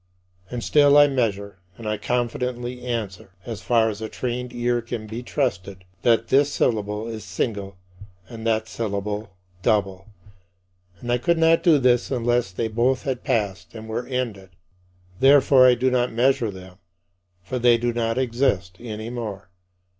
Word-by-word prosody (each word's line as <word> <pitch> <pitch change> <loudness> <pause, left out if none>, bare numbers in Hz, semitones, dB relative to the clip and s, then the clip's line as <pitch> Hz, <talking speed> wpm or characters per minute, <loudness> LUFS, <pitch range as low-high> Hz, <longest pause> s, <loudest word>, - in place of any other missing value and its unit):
And 120 -2 -5
still 145 -1 +5
I 145 - +8
measure, 100 -8 -2 0.2
and 115 -2 -7
I 105 0 -1
confidently 125 +2 -2
answer 105 -4 -4
as 115 -4 -6
far 115 -2 +2
as 110 -1 -4
a 110 - -4
trained 125 0 -4
ear 120 0 0
can 115 -1 -6
be 110 +3 -6
trusted 100 -8 -3 0.2
that 115 -1 +2
this 140 +2 +3
syllable 105 -3 -1
is 110 -2 -6
single 100 -5 -4 0.5
and 115 +1 -9
that 110 0 +1
syllable 105 -2 -4 0.3
double. 95 -1 0 0.9
And 120 - -4
I 120 - +2
could 170 +6 +1
not 165 0 +4
do 165 -4 +5
this 125 -2 +2
unless 120 -4 0
they 110 +5 -2
both 120 +4 0
had 130 -3 -3
passed 100 -1 -2
and 110 0 -8
were 115 +3 -4
ended. 115 -7 -4 0.7
Therefore 135 -1 +6
I 125 - +5
do 130 +2 +1
not 125 -1 +1
measure 120 -1 +2
them, 95 -1 -11 0.6
for 125 +7 -4
they 120 -1 +5
do 120 0 -1
not 115 0 -1
exist 120 -7 0
any 110 -1 -6
more. 105 -6 -6
115 Hz, 160 wpm, -23 LUFS, 105-125 Hz, 0.9 s, I